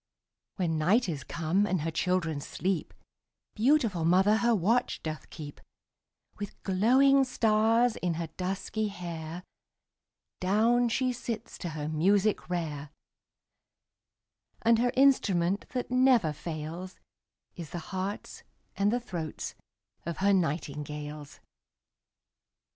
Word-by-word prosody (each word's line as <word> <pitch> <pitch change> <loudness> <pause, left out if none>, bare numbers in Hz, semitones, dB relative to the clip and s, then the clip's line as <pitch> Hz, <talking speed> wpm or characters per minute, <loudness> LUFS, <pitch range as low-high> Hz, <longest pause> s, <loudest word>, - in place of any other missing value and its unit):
When 165 -5 -1
night 205 +9 +3
is 150 -6 -3
come, 170 +7 0
and 185 -4 0
her 165 +2 -2
children 165 -3 0
sleep, 180 +4 -2 0.6
Beautiful 225 - +2
mother 190 +6 +4
her 235 0 +3
watch 225 +6 +1
doth 155 -1 -5
keep; 145 -2 -9 0.8
With 205 -1 -7
glowing 260 +8 +4
stars 225 -1 +2
in 175 -2 -1
her 165 +1 -3
dusky 195 +4 -2
hair 170 -3 -6 1.0
Down 230 +6 +3
she 255 +2 0
sits 230 -1 -5
to 175 - -4
her 150 0 -3
music 190 +8 +2
rare; 150 -5 -3 1.7
And 230 0 +4
her 245 +1 +2
instrument 200 -9 +3
that 250 -1 -4
never 250 - +4
fails, 165 +4 -6 0.6
Is 170 -4 -7
the - - -5 0.2
hearts 190 +2 -4 0.3
and 200 +1 +2
the 245 - +1
throats 175 -10 -5 0.5
of 170 -1 -4
her 200 +1 +3
nightingales. 150 -3 -3
185 Hz, 115 wpm, -29 LUFS, 160-225 Hz, 1.7 s, mother